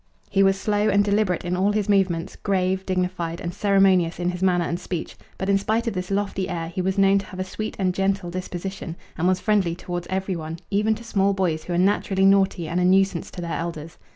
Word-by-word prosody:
He 195 - +3
was 195 0 +3
slow 210 +1 +1
and 200 0 +3
deliberate 200 -4 +1
in 175 +1 -1
all 195 +3 +2
his 210 -2 0
movements, 190 -5 +1
grave, 190 -1 -1
dignified, 180 -2 -2
and 175 0 -4
ceremonious 195 -4 +3
in 175 0 0
his 180 0 -7
manner 180 -2 +2
and 170 +1 -2
speech; 175 -2 -5 0.2
but 190 - -3
in 200 0 +3
spite 220 +4 0
of 230 - -1
this 180 -1 -4
lofty 195 -1 -1
air 165 -2 -3
he 180 +2 -3
was 190 +2 -1
known 195 0 +5
to 195 - -7
have 185 - -9
a - - 0
sweet 215 +3 -5
and 185 -2 +1
gentle 195 -2 -1
disposition 185 -1 -5 0.2
and 175 +1 0
was 185 0 +2
friendly 200 -6 +1
towards 175 0 -5
every 190 0 -1
one, 160 0 -5
even 210 +2 +2
to 230 - -10
small 200 -3 +1
boys 170 -5 -1
who 175 - -3
are - - +1
naturally 190 0 +2
naughty 195 -3 +3
and 170 +3 -1
a - - +2
nuisance 190 -1 +2
to 180 - -8
their 170 -1 -4
elders. 165 -1 -6
190 Hz, 235 wpm, -23 LUFS, 175-195 Hz, 0.2 s, known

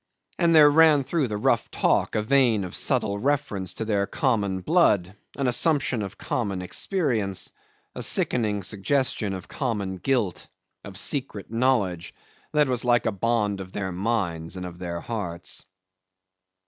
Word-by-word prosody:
And 170 -2 +4
there 150 -2 +8
ran 155 -2 +5
through 140 +1 0
the 105 -2 -3
rough 105 - +1
talk - - +1
a 105 - +1
vein 120 -4 +3
of 90 - -7
subtle 110 -7 0
reference 105 -8 0
to 110 - -3
their 100 -2 0
common 100 -8 0
blood, 100 - +2 0.2
an 140 - -1
assumption 130 -1 +1
of 100 0 -6
common 100 -6 -2
experience; 110 - -1 0.4
a - - -6
sickening 105 -5 +1
suggestion 110 +1 0
of 95 -2 -6
common 105 -8 -3
guilt, 105 -3 -1 0.4
of 95 -1 -9
secret 125 -5 -2
knowledge 115 -8 0 0.4
that 150 -1 +3
was 125 -2 0
like 120 -2 +3
a 110 - +2
bond 105 -1 0
of 95 0 -10
their 95 -2 -3
minds 90 -4 -2
and 90 - -5
of 90 -1 -9
their 85 -2 -4
hearts. 90 -7 -5
110 Hz, 150 wpm, -25 LUFS, 95-130 Hz, 0.4 s, there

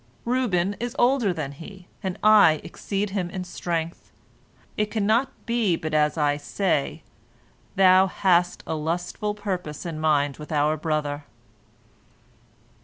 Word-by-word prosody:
Reuben 205 -7 +1
is 240 +1 -4
older 240 -4 +3
than 155 -5 -4
he, 180 +6 -12 0.2
and 190 -2 -3
I 215 -6 +7
exceed 200 0 -3
him 185 -3 -2
in 185 +1 -5
strength. 170 -2 -4 0.6
It 210 0 0
cannot 220 +4 +2
but - - -32
be 230 -7 +1
as 150 +1 +2
I 145 -1 +2
say, 150 -1 -1 0.7
thou 190 0 +6
hast 180 -2 +1
a - - -3
lustful 175 +6 -2
purpose 185 -7 -4
in 165 -3 -4
mind 145 -3 +1
with 150 +2 -10
our 150 0 +2
brother. 150 -2 -2
180 Hz, 130 wpm, -24 LUFS, 155-205 Hz, 0.7 s, I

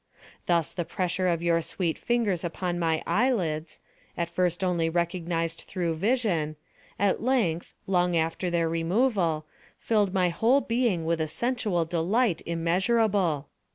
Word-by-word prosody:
Thus 170 -4 +2
the 175 - -3
pressure 185 +2 -1
of 170 -1 0
your 170 -1 +2
sweet 165 0 -2
fingers 225 -7 0
upon 175 +1 -2
my 165 -2 0
eyelids, 170 -7 0 0.4
at 170 -1 -1
first 180 +1 0
only 170 -3 +1
recognised 170 -1 -1
through 175 -3 -1
vision, 180 -5 0 0.4
at 200 -1 +1
length, 220 -10 0
long 180 -2 +2
after 165 +3 -1
their 170 -1 +1
removal, 165 -1 +1 0.3
filled 210 -4 +1
my 185 -2 +2
whole 235 +10 +3
being 230 -10 0
with 165 0 0
a 155 - 0
sensual 210 -2 -1
delight 175 +4 +1
immeasurable. 175 - +1
175 Hz, 135 wpm, -27 LUFS, 165-200 Hz, 0.4 s, whole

